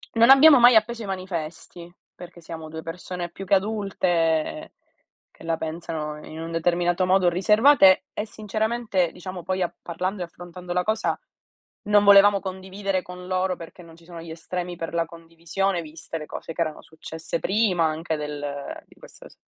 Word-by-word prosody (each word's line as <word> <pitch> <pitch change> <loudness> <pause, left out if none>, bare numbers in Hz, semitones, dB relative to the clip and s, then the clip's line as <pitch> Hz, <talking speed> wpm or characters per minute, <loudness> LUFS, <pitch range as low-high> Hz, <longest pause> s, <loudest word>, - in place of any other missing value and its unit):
Non 230 +2 +5
abbiamo 275 0 +9
mai 245 0 +7
appeso 225 +1 +2
i - - -6
manifesti 175 -2 -6 0.2
perché 175 -1 -12
siamo 160 -1 -8
2 160 +1 -7
persone 175 +1 -6
più 195 +3 -9
che 195 - 0
adulte, 185 -6 0 0.6
che - - -17
la 165 0 0
pensano 160 -2 -5
in 160 +1 -8
un 165 - -6
determinato 175 +2 +1
modo, 185 -1 +4
riservate, 210 +5 +5
e 210 - -4
sinceramente 215 -3 -1
diciamo 180 -1 -8
poi 185 0 -1
a 175 - -1
parlando 185 +3 -4
e - - -1
affrontando 175 +1 -9
la 180 0 +1
cosa 220 +3 0 0.7
non 205 -1 +4
volevamo 200 0 +7
condividere 190 0 -3
con 180 0 -10
loro, 185 0 0
perché 170 +1 -11
non 165 -1 -15
ci 170 - -20
sono 170 -1 -9
gli 165 -1 -9
estremi 175 +1 -5
per 165 0 -5
la 170 0 +1
condivisione, 170 +3 -3
viste 160 +1 -8
le 155 - -7
cose 165 - -8
che 170 - -3
erano 155 -2 -2
successe 160 +1 -6
prima 195 -3 +1
anche 160 +1 -1
del 145 -1 -6
di - - -21
questa - - -14
s - - -19
180 Hz, 175 wpm, -24 LUFS, 165-195 Hz, 0.7 s, abbiamo